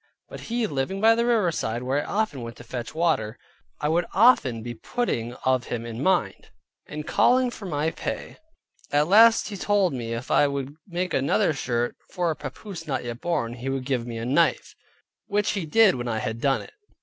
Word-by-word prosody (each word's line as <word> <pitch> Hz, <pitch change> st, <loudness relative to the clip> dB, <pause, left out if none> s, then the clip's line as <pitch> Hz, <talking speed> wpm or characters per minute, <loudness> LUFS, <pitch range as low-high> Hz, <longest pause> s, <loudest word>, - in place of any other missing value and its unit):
But -, -, -8 dB
he 235 Hz, 0 st, 0 dB
living 145 Hz, +3 st, -2 dB
by 225 Hz, +2 st, +6 dB
the 235 Hz, +1 st, +1 dB
riverside, 170 Hz, -, 0 dB
where 135 Hz, +3 st, 0 dB
I -, -, -7 dB
often 205 Hz, -, -1 dB
went 115 Hz, 0 st, -7 dB
to -, -, -12 dB
fetch 120 Hz, +2 st, -6 dB
water, 155 Hz, -10 st, 0 dB, 0.4 s
I 150 Hz, -, -1 dB
would 170 Hz, +2 st, +1 dB
often 165 Hz, -, +4 dB
be 120 Hz, 0 st, -5 dB
putting 120 Hz, -, -2 dB
of 130 Hz, -1 st, +2 dB
him 115 Hz, -1 st, -4 dB
in 115 Hz, +1 st, -6 dB
mind, 140 Hz, -, 0 dB, 0.4 s
and 150 Hz, 0 st, -6 dB
calling 250 Hz, +6 st, +3 dB
for 205 Hz, -4 st, -8 dB
my 155 Hz, -1 st, -1 dB
pay: -, -, -5 dB, 0.5 s
At 145 Hz, +1 st, +3 dB
last 225 Hz, +5 st, +6 dB
he 205 Hz, -, -6 dB
told 200 Hz, -3 st, +2 dB
me 115 Hz, -3 st, -4 dB
if 120 Hz, +2 st, -6 dB
I 145 Hz, -, +5 dB
would 140 Hz, 0 st, -4 dB
make 180 Hz, 0 st, -3 dB
another 140 Hz, +3 st, +2 dB
shirt, 120 Hz, -3 st, -2 dB
for 175 Hz, -2 st, -1 dB
a -, -, -3 dB
papoose 165 Hz, +5 st, -8 dB
not 135 Hz, -3 st, -2 dB
yet 120 Hz, -1 st, -6 dB
born, 165 Hz, -9 st, -1 dB
he 125 Hz, +2 st, -5 dB
would 135 Hz, -1 st, -2 dB
give 125 Hz, -3 st, -1 dB
me 115 Hz, -1 st, -5 dB
a 115 Hz, -, -4 dB
knife, 155 Hz, +7 st, +1 dB, 0.5 s
which 205 Hz, 0 st, +1 dB
he 190 Hz, -6 st, -3 dB
did 225 Hz, +4 st, +5 dB
when 120 Hz, -1 st, -4 dB
I 110 Hz, -2 st, -1 dB
had 110 Hz, +1 st, -3 dB
done 135 Hz, -2 st, +1 dB
it. -, -, -15 dB
145 Hz, 205 wpm, -25 LUFS, 120-190 Hz, 0.5 s, by